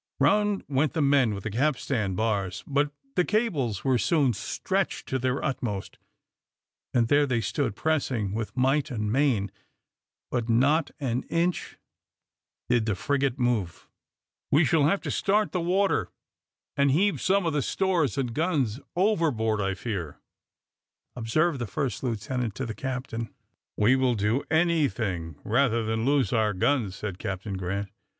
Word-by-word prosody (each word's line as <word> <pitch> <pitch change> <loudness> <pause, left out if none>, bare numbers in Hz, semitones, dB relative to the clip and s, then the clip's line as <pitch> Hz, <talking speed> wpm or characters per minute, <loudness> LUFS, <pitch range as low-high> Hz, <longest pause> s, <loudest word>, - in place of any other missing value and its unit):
Round 210 -1 +2
went 140 +1 +1
the 160 - 0
men 135 -6 +3
with 100 - -7
the 110 - -3
capstan 125 -5 0
bars, 100 -3 -1
but 145 +1 +1 0.2
the 180 - +3
cables 165 - 0
were 130 -3 +2
soon 145 -5 +2
stretched - - -2
to 130 - 0
their 130 +1 -1
utmost, 125 -8 -3 0.9
and 120 -2 +2
there 145 +3 +4
they 125 -3 +1
stood 115 +1 -1
pressing 130 -10 0
with 110 +3 -4
might 135 +3 +2
and 105 -5 -2
main, 120 -7 +1 0.8
but 120 -2 -1
not 140 +7 +3
an 125 -3 -1
inch 170 +1 -1 0.9
did 120 -2 +2
the 105 - +1
frigate 140 +5 0
move. 120 -9 -1 0.6
"We 150 +3 +4
shall 150 0 +3
have 195 +7 +2
to - - -3
start 210 +2 +1
the 180 - -1
water 190 +3 +1 0.7
and 140 0 +3
heave 190 +9 +2
some 195 0 +2
of 165 - 0
the 150 - +1
stores 175 -5 0
and 125 -4 -1
guns 145 - 0 0.2
overboard, 155 - +1
I 95 -1 -1
fear," 95 -10 -4 1.0
observed 135 +6 +1
the 120 - -3
first 130 +5 -2
lieutenant 120 -1 -2
to 130 - -3
the 115 - -4
captain. 125 -2 -4 0.5
"We 120 +5 +4
will 130 -2 +2
do 110 +6 0
anything 135 - +1
rather 115 0 +2
than 110 +1 -1
lose 140 -1 +2
our 110 -3 +2
guns," 105 -2 +1
said 100 -3 -5
Captain 100 +1 -4
Grant. 95 +2 -3
130 Hz, 150 wpm, -27 LUFS, 110-150 Hz, 1.0 s, there